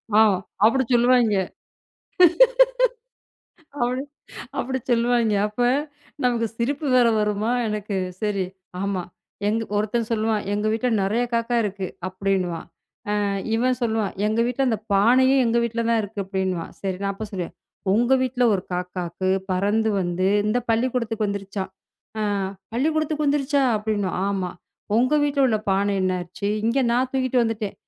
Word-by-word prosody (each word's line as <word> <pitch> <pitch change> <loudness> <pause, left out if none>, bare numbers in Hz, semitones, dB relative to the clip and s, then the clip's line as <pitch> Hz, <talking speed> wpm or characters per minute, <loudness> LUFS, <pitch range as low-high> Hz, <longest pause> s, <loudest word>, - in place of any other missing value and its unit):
ஆ. - - +7 0.5
அப்படி 260 +4 +4
சொல்லுவாய்ங்க. 240 -3 +4 2.4
அப்படி 250 +1 0 0.6
அப்படி 260 +1 -1
சொல்லுவாய்ங்க. 235 -2 +2
அப்ப 210 +3 -5 0.6
நமக்குச் 230 -2 0
சிரிப்பு 285 +6 -1
வேற 245 -2 +5
வருமா? 210 +2 0 0.2
எனக்கு. 210 -1 -3 0.3
சரி. 205 -3 0 0.4
ஆமா. 195 -2 -1 0.4
எங் 210 - +2 0.2
ஒருத்தன் 215 +2 0
சொல்லுவான். 220 -2 0
"எங்க 210 +1 -1
வீட்டுல 225 +3 0
நிறைய 210 +5 +1
காக்கா 235 +1 0
இருக்கு" 200 -2 -3 0.2
அப்படின்னுவான். 185 -3 -2 0.6
அ - - 0 0.3
இவன் 250 +2 +2
சொல்லுவான். 220 -4 0
"எங்க 220 +2 +1
வீட்டுல 250 +2 0
அந்தப் 220 -4 -1
பானையும் 255 +7 +5
எங்க 235 0 +2
வீட்டுல 230 0 -1
தான் 230 -1 +3
இருக்கு" 205 0 -6
அப்படின்னுவான். 190 -3 -2
சரி. 190 -1 -2
நான் 200 0 0
அப்பச் 210 +1 -7
சொல்லுவேன். 185 -5 -5 0.4
"உங்க 240 +5 +4
வீட்டுல 250 -1 0
ஒரு 185 - -2
காக்காக்கு 180 0 -3 0.2
பறந்து 205 +4 +1
வந்து 180 +1 -1 0.2
இந்தப் 240 +3 0
பள்ளிக்கூடத்துக்கு 230 -2 0
வந்துருச்சாம்." 195 -1 -4 0.5
அ - - 0 0.5
"பள்ளிக்கூடத்துக்கு 310 +3 0
வந்துருச்சா?" 285 0 +2 0.2
அப்படின்னுவான். 205 -4 -2
"ஆமா. 190 -3 -2 0.5
உங்க 255 +5 +3
வீட்டுல 280 -1 +2
உள்ள 220 -2 +1
பானை 200 +1 +2
என்னாச்சு? 185 +1 -2 0.2
இங்க 230 +4 +1
நான் 250 +2 +1
தூக்கிட்டு 255 -2 +1
வந்துட்டேன்." 225 -3 -2
220 Hz, 135 wpm, -23 LUFS, 200-245 Hz, 2.4 s, ஆ